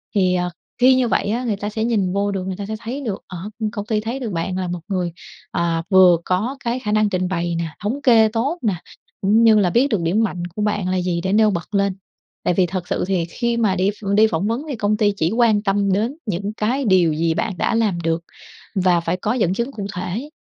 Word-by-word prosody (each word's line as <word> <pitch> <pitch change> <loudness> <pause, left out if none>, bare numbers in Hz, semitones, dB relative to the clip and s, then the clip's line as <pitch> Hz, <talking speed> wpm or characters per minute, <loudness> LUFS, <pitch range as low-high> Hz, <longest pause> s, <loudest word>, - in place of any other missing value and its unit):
thì, 185 -2 +3
ờ, 180 0 0 0.3
khi 255 +1 +6
như 255 -1 +2
vậy 215 - 0
á, 235 +4 -1
người 220 -4 0
ta 205 +1 -4
sẽ 220 +1 -3
nhìn 205 -6 +1
vô 200 +1 0
được, 190 -2 -3
người 190 - -3
ta 200 - -5
sẽ 220 +2 -4
thấy 245 +6 -5
được 215 -8 -4
ở 180 - -7 0.2
ưm, 215 -2 -1
công 205 -2 -5
ty 215 -1 0
thấy 230 +5 -4
được 235 -6 -4
bạn 180 +2 -2
là 185 -1 -2
một 175 0 -3
người, 180 -4 -2 0.4
à, 170 -1 0
vừa 185 -3 +7
có 215 +10 -1
cái 240 +1 -1
khả 210 -5 -3
năng 215 0 +3
trình 185 -1 -1
bày 170 -2 -2
nè, 165 0 -2 0.2
thống 245 +8 -2
kê 230 -5 +6
tốt 240 +9 -1
nè, 210 -6 +1 0.5
cũng 210 +4 +4
như 220 -2 +6
là 185 - +3
biết 240 +10 +3
được 215 -9 0
điểm 185 +7 +1
mạnh 180 -5 -2
của 210 - -3
bạn 205 -3 0
là 185 0 0
gì 175 -1 -1
để 190 +2 -1
nêu 215 0 +5
bật 175 +2 -5
lên. 200 -1 +1 0.5
Tại - - +2
vì 180 +1 +3
thật 180 0 -4
sự - - -1
thì 185 -3 0
khi 235 +7 -2
mà 215 -5 +2
đi 190 +1 +2
ph 205 0 -13
đi 215 +1 +6
phỏng 185 +1 -1
vấn 235 +5 -1
thì 280 - -2
công 210 -1 0
ty 205 -2 +2
chỉ 165 0 +1
quan 225 -3 +3
tâm 200 -1 +1
đến 225 +9 -1
những 200 0 -3
cái 240 +6 -1
điều 180 -5 +4
gì 160 +1 +1
bạn 205 +1 -2
đã 225 - 0
làm 210 -7 +1
được 165 0 0 0.5
và 180 -3 +3
phải 170 +2 -2
có 210 +5 -1
dẫn 200 -8 +1
chứng 235 +7 -2
cụ 200 -5 -5
thể. 195 +10 -4
205 Hz, 260 wpm, -21 LUFS, 180-225 Hz, 0.5 s, vừa